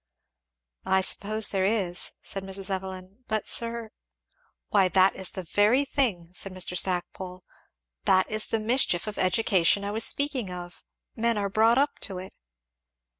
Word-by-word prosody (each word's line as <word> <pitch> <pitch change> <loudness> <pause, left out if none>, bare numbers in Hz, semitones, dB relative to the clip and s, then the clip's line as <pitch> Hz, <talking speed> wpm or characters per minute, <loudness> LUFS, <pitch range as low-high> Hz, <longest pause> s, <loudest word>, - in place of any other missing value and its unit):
"I 190 0 +3
suppose 210 +3 +1
there 195 -2 0
is," 190 -4 0
said 195 - -4
Mrs. 195 0 -4
Evelyn, 190 +3 -6
"but 220 -1 -1
sir 230 -1 0 0.4
" - - -43
"Why 195 -3 +4
that 185 +2 +4
is 190 - -2
the 185 - -6
very 210 - +3
thing," 210 -12 -1
said 195 +1 -4
Mr. 180 -1 -2
Stackpole, 180 0 -2 0.6
"that 185 0 +4
is 215 0 +1
the 225 - 0
mischief 220 -5 +1
of 215 -1 -5
education 190 -1 +2
I 200 - -3
was 220 +2 +2
speaking 275 -7 +1
of 175 0 -9 0.3
men 230 -1 +1
are 200 -1 -1
brought 225 +4 +4
up 285 +2 +1
to 190 -3 -4
it." 185 +1 -8
195 Hz, 160 wpm, -27 LUFS, 185-225 Hz, 0.6 s, Why